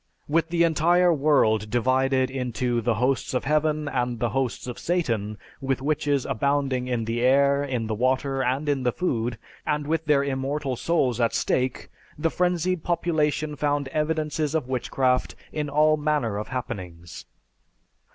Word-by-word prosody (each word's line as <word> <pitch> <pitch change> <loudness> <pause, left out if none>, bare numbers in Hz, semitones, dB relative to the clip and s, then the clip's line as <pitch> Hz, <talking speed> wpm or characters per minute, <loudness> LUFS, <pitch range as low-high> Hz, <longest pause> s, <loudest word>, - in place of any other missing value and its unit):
With 165 +2 +1
the 170 0 +2
entire 170 +2 +4
world 135 -8 +2
divided 130 +2 +1
into 125 -2 -1
the 115 0 +1
"Hosts 130 +3 0
of 125 - 0
Heaven" 150 +1 +1
and 125 -3 -1
the 120 +1 0
"Hosts 130 -1 -2
of 125 -1 -6
Satan," 115 - -1 0.2
with 135 0 -1
witches 145 -1 0
abounding 135 0 0
in 120 -3 -1
the 115 +1 -2
air, 140 +2 +4
in 125 -5 -2
the 110 - -2
water, 130 +4 0
and 130 +4 -1
in 140 -2 +1
the 125 -1 +1
food, 120 -8 -2 0.3
and 150 0 -1
with 160 +2 -1
their 145 -2 +3
immortal 135 0 -2
souls 125 -5 0
at 115 - +1
stake, 130 0 -1 0.3
the 165 +2 0
frenzied 180 -1 0
population 155 -3 0
found 145 -1 -1
evidences 155 0 -1
of 155 -6 -1
witchcraft 130 0 0 0.2
in 150 -2 -3
all 155 +2 +3
manner 145 -9 0
of 105 - -5
happenings. 90 -9 -6
135 Hz, 155 wpm, -25 LUFS, 125-150 Hz, 0.3 s, entire